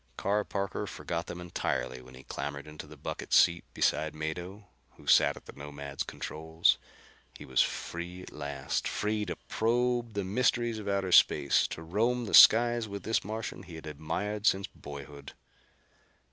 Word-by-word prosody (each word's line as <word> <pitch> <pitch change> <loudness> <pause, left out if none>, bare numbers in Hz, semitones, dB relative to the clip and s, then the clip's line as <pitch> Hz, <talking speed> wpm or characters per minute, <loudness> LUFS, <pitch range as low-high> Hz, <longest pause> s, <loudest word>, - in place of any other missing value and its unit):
Carr 105 +2 +1
Parker 100 -1 -3
forgot 85 0 -4
them 85 - -6
entirely 85 -7 -3
when 65 0 -14
he 65 - -13
clambered 70 +1 -5
into 75 0 -9
the 75 0 -13
bucket - - -6
seat 85 0 +5
beside 80 -1 +1
Mado, 90 +7 -5 0.3
who - - -16
sat - - +5
at - - -13
the - - -11
Nomad's 70 -1 -7
controls. 80 +1 0 0.6
He - - -10
was 65 -1 +3
free 90 +2 -4
at - - -11
last: 70 -1 -3
free 105 0 -1
to 85 - -4
probe 120 0 0
the 100 - 0
mysteries 120 +2 +1
of 105 - -8
outer 100 -2 0
space, 70 -4 +5
to 80 - -7
roam 115 +8 0
the - - -6
skies 120 0 +7
with 100 -1 -7
this 110 +1 0
Martian 110 -1 -5
he 90 -3 -11
had 80 - -9
admired 100 +8 -3
since 95 0 +3
boyhood. 70 0 -10
90 Hz, 165 wpm, -30 LUFS, 75-105 Hz, 0.6 s, skies